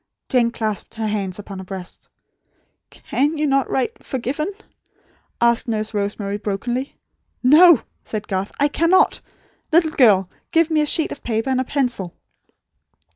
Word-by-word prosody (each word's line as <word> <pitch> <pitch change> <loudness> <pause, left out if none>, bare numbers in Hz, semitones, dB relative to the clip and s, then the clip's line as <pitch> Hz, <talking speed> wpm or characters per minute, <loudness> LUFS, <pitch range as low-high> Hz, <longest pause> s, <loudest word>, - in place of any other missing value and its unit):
Jane 245 -2 +3
clasped 220 -3 -4
her 225 -1 -3
hands 200 -4 -2
upon 200 -2 -8
her - - -7
breast. 185 -1 -9 0.8
"CAN 295 +4 -1
you 300 - 0
not 275 -2 +1
write 435 - -2
'forgiven'?" 275 - -3 0.9
asked 235 +2 +2
Nurse 215 -1 -2
Rosemary, 205 0 -2
brokenly. 240 +6 -3 0.5
"No," 310 +2 +7 0.2
said 215 -1 -5
Garth. 190 0 -2
"I 285 - +4
cannot. 335 +5 +3 0.5
Little 320 -1 +4
girl, 205 - +4 0.2
give 330 -1 +3
me 310 -1 +3
a 300 - 0
sheet 320 +1 +1
of - - -7
paper, 225 +2 -1
and 260 0 +1
a - - -3
pencil." 245 - -1
240 Hz, 145 wpm, -21 LUFS, 205-290 Hz, 0.9 s, No